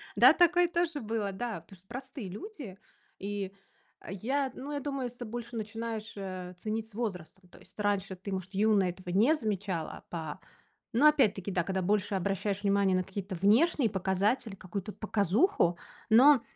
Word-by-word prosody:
да, -, -, +8 dB
такое 350 Hz, 0 st, +5 dB
тоже 340 Hz, -3 st, -1 dB
было, 215 Hz, -3 st, -2 dB
да, 225 Hz, +3 st, -4 dB
потому 195 Hz, -, -16 dB
что 185 Hz, +2 st, -29 dB
простые 260 Hz, -4 st, -7 dB
люди. 245 Hz, -, -8 dB, 0.4 s
И 200 Hz, -1 st, -4 dB, 0.6 s
я, 260 Hz, +8 st, -1 dB
ну, 285 Hz, +3 st, -6 dB
я 285 Hz, -, -1 dB
думаю, 275 Hz, -2 st, -3 dB
если 245 Hz, 0 st, -7 dB
ты 245 Hz, -, -4 dB
больше 240 Hz, +1 st, -6 dB
начинаешь, 225 Hz, 0 st, -4 dB
э, 185 Hz, -2 st, -5 dB
ценить 220 Hz, +1 st, -3 dB
с -, -, -19 dB
возрастом. 190 Hz, -5 st, -5 dB
То -, -, -16 dB
есть 185 Hz, -, -19 dB
раньше 200 Hz, -2 st, 0 dB
ты, 195 Hz, +2 st, -7 dB
может, 190 Hz, +1 st, -4 dB
юная 205 Hz, -2 st, +3 dB
этого 180 Hz, +1 st, -8 dB
не 215 Hz, -, +4 dB
замечала, 200 Hz, -, -3 dB
па 160 Hz, -3 st, -5 dB, 0.5 s
но 255 Hz, +7 st, +4 dB
опять-таки, 210 Hz, -10 st, +3 dB
да, 175 Hz, -2 st, +1 dB
когда 190 Hz, +1 st, -1 dB
больше 200 Hz, +1 st, +1 dB
обращаешь 200 Hz, +1 st, -1 dB
внимание 200 Hz, -2 st, +3 dB
на 185 Hz, -, +1 dB
какие-то 190 Hz, +1 st, -5 dB
внешние 225 Hz, -, +4 dB
показатели, 195 Hz, +4 st, 0 dB
какую-то 190 Hz, +2 st, -5 dB
показуху, 205 Hz, -, +2 dB, 0.3 s
но 255 Hz, +3 st, +7 dB
205 Hz, 165 wpm, -30 LUFS, 190-240 Hz, 0.6 s, да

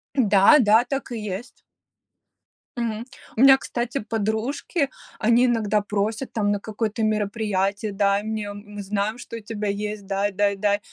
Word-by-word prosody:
Да 210 Hz, +1 st, +6 dB
да, 225 Hz, 0 st, +5 dB
так 270 Hz, 0 st, -4 dB
и 235 Hz, -, -3 dB
есть. 210 Hz, +3 st, -6 dB, 1.2 s
Мгм. 230 Hz, -1 st, -2 dB, 0.3 s
У -, -, +2 dB
меня, 270 Hz, 0 st, +9 dB
кстати, 245 Hz, 0 st, -3 dB
подружки, 225 Hz, -, -1 dB, 0.3 s
они 235 Hz, +3 st, +4 dB
иногда 215 Hz, -4 st, +1 dB
просят 210 Hz, +5 st, -2 dB
там 205 Hz, -2 st, +1 dB
на 205 Hz, -, 0 dB
какое-то 220 Hz, +1 st, -3 dB
мероприятие: 210 Hz, -1 st, 0 dB
"Дай 200 Hz, 0 st, +1 dB
мне, 215 Hz, -2 st, -4 dB
мы 205 Hz, 0 st, -9 dB
знаем, 205 Hz, +3 st, -1 dB
что 235 Hz, -, -9 dB
у -, -, -6 dB
тебя 210 Hz, -1 st, -5 dB
есть, 210 Hz, 0 st, -3 dB
дай, 200 Hz, +1 st, 0 dB
дай, 200 Hz, +1 st, +1 dB
дай". 205 Hz, +1 st, +1 dB
215 Hz, 155 wpm, -24 LUFS, 205-230 Hz, 1.2 s, меня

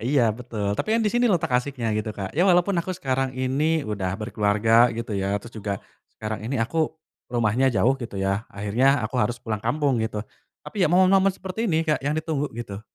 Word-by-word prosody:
Iya 140 Hz, -4 st, +4 dB
betul 110 Hz, -4 st, -4 dB
tapi -, -, -2 dB
kan 230 Hz, -, +2 dB
di 210 Hz, -, +2 dB
sini 240 Hz, 0 st, +2 dB
letak 170 Hz, -, +1 dB
asyiknya 125 Hz, -3 st, -3 dB
gitu 110 Hz, 0 st, -3 dB
Kak 95 Hz, -2 st, -5 dB
ya 170 Hz, -, +2 dB
walaupun 180 Hz, +1 st, +3 dB
aku 185 Hz, +2 st, -2 dB
sekarang 130 Hz, -3 st, -1 dB
ini 145 Hz, +5 st, +1 dB
udah 100 Hz, -5 st, -2 dB
berkeluarga 110 Hz, +2 st, +3 dB
gitu 115 Hz, -1 st, -4 dB
ya 100 Hz, +1 st, -1 dB
terus 120 Hz, -, -10 dB
juga, 100 Hz, -2 st, -3 dB, 0.4 s
sekarang 110 Hz, 0 st, -5 dB
ini 135 Hz, +2 st, -1 dB
aku, 160 Hz, +6 st, -1 dB, 0.3 s
rumahnya 120 Hz, +2 st, +2 dB
jauh 120 Hz, +2 st, +3 dB
gitu 115 Hz, -4 st, -6 dB
ya 95 Hz, +3 st, -1 dB
akhirnya 120 Hz, +7 st, +1 dB
aku 110 Hz, -, -5 dB
harus 120 Hz, +3 st, 0 dB
pulang 110 Hz, -3 st, -3 dB
kampung 135 Hz, +1 st, +1 dB
gitu 110 Hz, -1 st, -2 dB, 0.4 s
tapi 210 Hz, -, -5 dB
ya -, -, +3 dB
momen-momen 190 Hz, +3 st, +5 dB
seperti 190 Hz, +5 st, -4 dB
ini 160 Hz, -1 st, +2 dB
Kak 155 Hz, -1 st, +1 dB
yang 145 Hz, -, +1 dB
ditunggu 155 Hz, -2 st, -1 dB
gitu. 105 Hz, -4 st, -6 dB
125 Hz, 200 wpm, -24 LUFS, 110-155 Hz, 0.4 s, momen-momen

